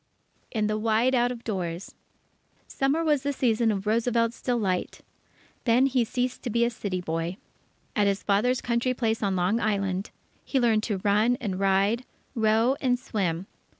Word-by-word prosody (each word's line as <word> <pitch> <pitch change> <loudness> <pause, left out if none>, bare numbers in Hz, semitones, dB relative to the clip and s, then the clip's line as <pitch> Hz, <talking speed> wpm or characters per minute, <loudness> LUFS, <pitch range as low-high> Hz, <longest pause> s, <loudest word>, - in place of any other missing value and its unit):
In 215 -3 -1
the 215 0 0
Wide 225 +4 +2
Out 245 -1 +3
of 240 -1 -7
Doors 180 -4 -4 0.7
Summer 275 +5 0
was 300 -4 +2
the 285 +1 -1
season 235 -4 +2
of 195 -1 -3
Roosevelt's 230 +1 +1
delight. 210 -8 -1 0.6
Then 245 +2 +4
he 260 -2 +2
ceased 250 +2 -2
to 245 - -4
be 235 +1 +2
a 235 - 0
city 200 -5 -3
boy. 165 +1 -3 0.6
At 205 -3 +3
his 200 0 0
father's 225 +5 +2
country 245 +1 0
place 225 -2 0
on 195 -3 0
Long 185 +5 +1
Island, 195 -3 -1 0.3
he 270 - 0
learned 230 -3 +3
to 200 -4 -2
run 210 +4 +3
and 195 -5 -3
ride, 195 +5 +2 0.3
row, 225 +3 +3
and 250 -2 +2
swim. 190 -8 -2
225 Hz, 165 wpm, -26 LUFS, 200-245 Hz, 0.7 s, Then